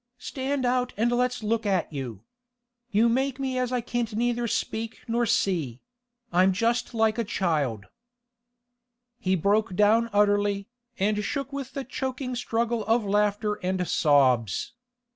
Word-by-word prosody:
Stand 265 +1 -3
out 250 0 +1
and 235 +3 +2
let's 245 -1 0
look 225 +1 0
at 190 -6 0
you. 120 -7 -6 0.7
You 220 +2 +3
make 260 +3 0
me 260 -1 -1
as 250 -1 -1
I 250 -1 0
can't 235 -2 -3
neither 240 +1 0
speak 225 0 -3
nor 235 +1 +1
see—I'm 195 - -1
just 230 +4 0
like 220 0 +2
a - - +2
child—' 150 - -1 1.3
He 185 0 +1
broke 200 +3 +1
down 220 +4 +4
utterly, 205 -1 +2 0.3
and 210 +2 +1
shook 280 +4 -3
with 275 -2 -5
the 275 - -3
choking 260 0 -4
struggle 235 -1 -1
of 225 0 +2
laughter 210 +1 +1
and 180 -1 -1
sobs. 130 -8 +2
225 Hz, 140 wpm, -26 LUFS, 195-245 Hz, 1.3 s, down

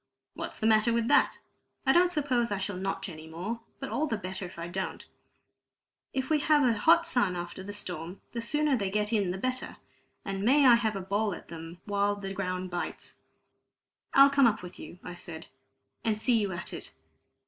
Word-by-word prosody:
What's - - -5
the - - -2
matter 220 +1 +4
with 230 0 +1
that? - - +4 0.5
I 265 - +5
don't 350 +4 +5
suppose 260 -8 +1
I 200 - 0
shall 195 0 -3
notch 195 +1 -3
any 160 -3 -9
more, 180 +9 -4 0.2
but 270 - -5
all 310 - 0
the 225 - -1
better 190 -1 -5
if 180 +1 -10
I 170 0 -4
don't; 185 +2 -4 1.1
if 265 0 -2
we 310 0 +3
have 295 0 +4
a 245 -3 +4
hot 335 +10 +5
sun 245 - +1
after 175 +1 -5
the 195 +2 -6
storm, 180 -3 -3
the 235 - -3
sooner 295 +4 +2
they 200 -5 -1
get 210 +2 0
in 200 -4 +2
the 180 - -2
better; 255 +5 -3 0.5
and 195 -1 -3
may 275 +5 +5
I 250 - +9
have 225 -3 +2
a 195 - -3
bowl 200 +1 0
at - - -13
them 165 +1 -9
while 205 0 +1
the 195 -1 -5
ground 185 -1 -3
bites!" 175 0 -4 1.0
"I'll 275 0 +8
come 280 -3 +6
up 215 -3 0
with 180 - -9
you," - - -9
I 180 - -6
said, 170 -2 -9 0.6
"and 220 -2 +1
see 230 0 +2
you 200 -2 -1
at 175 0 -6
it." - - -6
205 Hz, 205 wpm, -29 LUFS, 185-245 Hz, 1.1 s, I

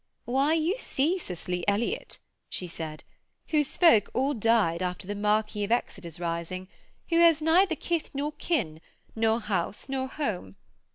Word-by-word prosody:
'Why, 270 +5 +2
you 335 +8 0
see 330 - 0
Cicely 180 - -4
Elliott,' 235 - -1 0.3
she 180 - -3
said, 160 -2 -6 0.5
'whose 300 -3 +1
folk 330 - +6
all 270 +3 +2
died 220 -7 +2
after 180 0 -2
the 205 - -3
Marquis 210 0 0
of 205 - -3
Exeter's 180 -8 -2
rising, 170 +2 -3 0.4
who 335 -1 +3
has 335 -2 +6
neither 325 +3 +4
kith 335 0 -2
nor 285 +2 -2
kin, 215 - -2 0.3
nor 225 0 +2
house 200 -3 -2
nor 265 -1 -1
home. 205 - -4
225 Hz, 150 wpm, -28 LUFS, 180-305 Hz, 0.5 s, folk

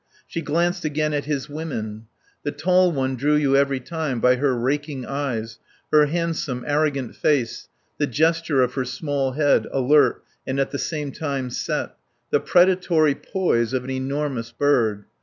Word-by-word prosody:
She 165 - -4
glanced 170 +4 0
again 155 0 0
at 145 -2 -1
his 145 -2 -2
women. 115 -8 -5 0.3
The 145 - -2
tall 180 +4 +3
one 135 -3 -1
drew 145 +4 +2
you 140 -2 +3
every 140 -1 +2
time 150 -2 -3
by 125 +2 +4
her 130 -2 +1
raking 140 +1 -2
eyes, 115 -6 -3 0.3
her 150 -1 +6
handsome, 160 -6 -2
arrogant 145 -4 0
face, 130 -7 0 0.3
the 145 - +2
gesture 160 0 +2
of 125 0 -1
her 130 - -1
small 135 +1 -2
head, 145 0 +2
alert 140 +3 +3 0.2
and 135 +1 -1
at 135 - 0
the 140 - -3
same 150 -3 -3
time 140 -4 -3
set, - - -2 0.4
the - - +4
predatory 175 -4 +3
poise 130 - 0
of 130 -1 0
an 130 - -5
enormous 130 -2 -3
bird. 115 -6 +1
140 Hz, 160 wpm, -23 LUFS, 130-155 Hz, 0.4 s, her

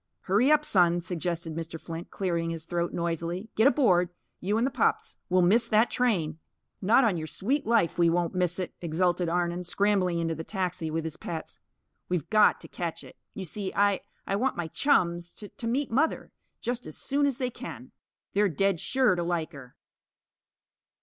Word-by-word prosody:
"Hurry 215 +9 +3
up, 300 0 +4
Son!" 175 - +4
suggested 170 -1 -3
Mr. 165 0 -5
Flint, 165 +1 -7
clearing 170 -3 -1
his 165 -1 -4
throat 170 0 -1
noisily. 170 +4 -3
"Get 220 +4 +5
aboard 185 - +3 0.3
you 205 +4 0
and 230 - +2
the 270 - 0
pups. - - 0
We'll 185 0 +4
miss 225 +6 +4
that 220 +1 +3
train!" 170 -11 0 0.4
"Not 225 +7 +5
on 210 -7 +2
your 155 -1 -4
sweet 255 - -1
life, 225 -8 +2
we 170 -1 +5
won't 170 +1 0
miss 180 -2 0
it!" 185 -2 -4
exulted 175 +1 +1
Arnon, 175 +1 0
scrambling 185 -1 +1
into 165 -1 0
the 160 +1 -5
taxi 180 -4 -3
with 160 +1 -2
his 160 -1 -5
pets. 160 -2 -6 0.5
"We've 180 -5 -1
got 215 -1 +5
to - - -10
catch 170 -2 -5
it. - - -13 0.2
You 190 - -5
see, 190 +3 -4
I 200 -1 +3 0.2
I 195 - -1
want 260 +5 0
my 170 -2 -3
chums 175 - +1
to 205 - -10
to 240 -4 -6
meet 260 +3 0
Mother; 295 +7 0 0.3
just 245 0 -3
as - - -8
soon 285 +1 +1
as 270 -3 -1
they 255 -2 -2
can. - - -9 0.4
They're 205 0 +3
dead 195 +2 +1
sure 260 -1 +2
to 175 - -1
like 170 -2 -1
her." 135 -5 -12
180 Hz, 190 wpm, -28 LUFS, 170-220 Hz, 0.5 s, Get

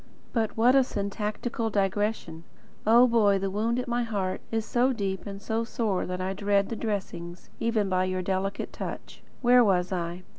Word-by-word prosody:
But 225 -3 -1
what 240 +3 +5
a 270 -1 +6
syntactical 210 +1 -3
digression! 200 -4 -1 0.4
Oh, 235 +3 +7
Boy, 220 -5 +4
the 195 0 -2
wound 225 +4 0
at 250 +1 -2
my 240 0 0
heart 200 -5 -2
is 225 -1 -1
so 250 +3 +2
deep 195 -4 -3
and 195 -1 -6
so 220 +2 -1
sore 220 -5 -1
that 180 0 -3
I 185 +1 -2
dread 200 0 +1
the 230 - -3
dressings, 185 -5 -5
even 225 -3 +1
by 185 -1 +1
your 185 0 -2
delicate 195 +1 -2
touch. - - -7 0.2
Where 245 0 +7
was 185 -3 +2
I? 175 0 -3
205 Hz, 180 wpm, -27 LUFS, 190-230 Hz, 0.4 s, Oh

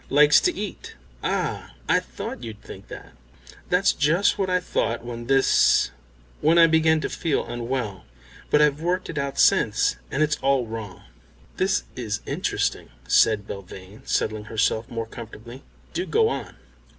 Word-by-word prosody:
"Likes 150 +1 +6
to 355 - +1
eat." 205 -2 -6 0.3
"Ah, - - -2
I - - +4
thought 120 - -7
you'd 110 -3 -7
think - - -11
that. - - -10 0.6
That's 180 +2 +3
just 165 +7 +2
what 190 -1 0
I 180 0 +2
thought 120 -9 -2
when 120 -1 -6
this 135 0 +4 0.5
when 160 +3 +4
I 170 - +9
began 160 -1 +3
to - - -1
feel 160 -4 -1
unwell. 120 -4 -4 0.4
But 150 - +5
I've 150 0 +2
worked 180 +2 -1
it 155 - -3
out 140 0 -3
since, - - +3
and 150 - +1
it's 150 -1 +1
all 135 -2 +2
wrong." 110 -4 -7 0.5
"This 190 +1 +1
is 110 -4 -3
interesting," - - -2 0.2
said 105 -2 +4
Belvane, 100 +1 -10
settling 110 -1 -1
herself 110 +1 0
more 115 -1 -4
comfortably. 115 +2 -10 0.3
"Do 360 - -2
go 445 0 +3
on." - - -5
135 Hz, 155 wpm, -24 LUFS, 115-160 Hz, 0.6 s, I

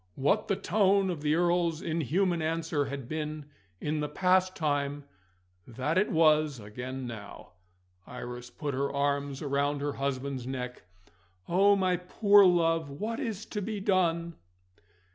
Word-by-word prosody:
What 200 +11 +1
the 195 - +1
tone 195 -1 +2
of 165 -4 -5
the 150 +1 +2
Earl's 170 -1 +1
inhuman 170 +3 0
answer 160 -2 -1
had 135 -2 -6
been 155 0 -4 0.3
in 150 +1 -2
the 150 0 -2
past 185 0 +2
time, 145 -2 -1 0.6
that 130 +7 -2
it 190 +3 +2
was 155 -4 +3
again 125 +5 -6
now. 110 -6 -9 0.6
Iris 125 0 -7
put 145 +1 -4
her 140 +2 -1
arms 140 0 -1
round 140 0 0
her 145 0 -1
husband's 135 -2 -3
neck. 125 -4 -5 0.6
"Oh, 200 +3 +5
my 185 -2 +1
poor 200 +3 +5
love, 165 -3 +2
what 215 +12 -4
is 225 -6 -4
to 210 - -2
be 210 +1 -3
done?" 170 -4 +1
155 Hz, 145 wpm, -29 LUFS, 140-180 Hz, 0.6 s, Oh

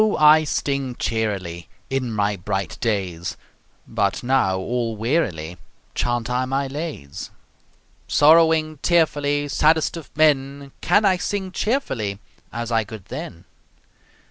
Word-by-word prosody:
I 155 +1 +6
sting 140 -3 -2
cheerily 100 -9 -3 0.2
In 130 -3 -1
my 105 -1 0
bright 100 +3 -3
days, 95 -6 -2 0.5
But 105 -1 -1
now 120 -7 +2
all 115 +3 -2
wearily 105 - -1 0.4
Chaunt 120 -1 -1
I 125 +1 0
my 135 +2 -1
lays; 140 - -6 0.8
Sorrowing 155 0 +4
tearfully, 145 -4 +2
Saddest 155 +3 +2
of 155 -6 -9
men, 140 -2 +2
Can 210 - +3
I 190 -2 +4
sing 190 +1 -3
cheerfully, 135 - -1 0.3
As 120 +1 -4
I 115 -1 +2
could 105 -2 -10
then? 115 - -7
130 Hz, 115 wpm, -22 LUFS, 105-155 Hz, 0.8 s, I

